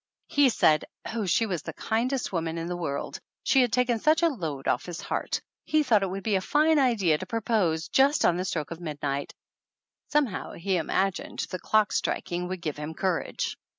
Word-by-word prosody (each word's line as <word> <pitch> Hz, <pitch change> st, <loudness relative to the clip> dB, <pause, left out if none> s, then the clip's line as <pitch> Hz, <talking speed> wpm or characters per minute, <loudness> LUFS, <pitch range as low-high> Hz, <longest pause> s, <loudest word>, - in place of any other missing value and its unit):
He 285 Hz, -2 st, +4 dB
said 155 Hz, -9 st, +3 dB, 0.3 s
oh, 220 Hz, -4 st, -2 dB
she 225 Hz, +6 st, +3 dB
was 180 Hz, -6 st, -2 dB
the -, -, -7 dB
kindest 240 Hz, +1 st, -1 dB
woman 165 Hz, -1 st, -2 dB
in 165 Hz, -, -3 dB
the 175 Hz, +1 st, -3 dB
world. 140 Hz, -5 st, -4 dB, 0.2 s
She 270 Hz, -, +4 dB
had 245 Hz, -2 st, +2 dB
taken 245 Hz, -1 st, +2 dB
such 310 Hz, +6 st, +3 dB
a 335 Hz, -, +6 dB
load 160 Hz, -, -4 dB
off 125 Hz, -, +1 dB
his 175 Hz, -1 st, -5 dB
heart! -, -, -2 dB, 0.2 s
He 310 Hz, 0 st, +2 dB
thought 225 Hz, -7 st, +4 dB
it 195 Hz, -, 0 dB
would 195 Hz, +1 st, -5 dB
be 220 Hz, -, 0 dB
a 190 Hz, -, +2 dB
fine 305 Hz, +7 st, +3 dB
idea 205 Hz, -, +3 dB
to -, -, -6 dB
propose 200 Hz, -8 st, 0 dB
just 275 Hz, -, +3 dB
on 170 Hz, -, +4 dB
the 180 Hz, +1 st, -2 dB
stroke 160 Hz, -5 st, -3 dB
of 170 Hz, +1 st, -7 dB
midnight 145 Hz, -3 st, -3 dB, 0.7 s
some 295 Hz, -1 st, +3 dB
how 210 Hz, -, -6 dB
he 185 Hz, +2 st, -1 dB
imagined 190 Hz, +3 st, -1 dB
the 185 Hz, -, -3 dB
clock 215 Hz, +2 st, +2 dB
striking 175 Hz, +1 st, -1 dB
would 185 Hz, -1 st, -5 dB
give 155 Hz, -3 st, -3 dB
him 150 Hz, +2 st, -6 dB
courage! 185 Hz, -1 st, -2 dB
190 Hz, 205 wpm, -27 LUFS, 165-240 Hz, 0.7 s, a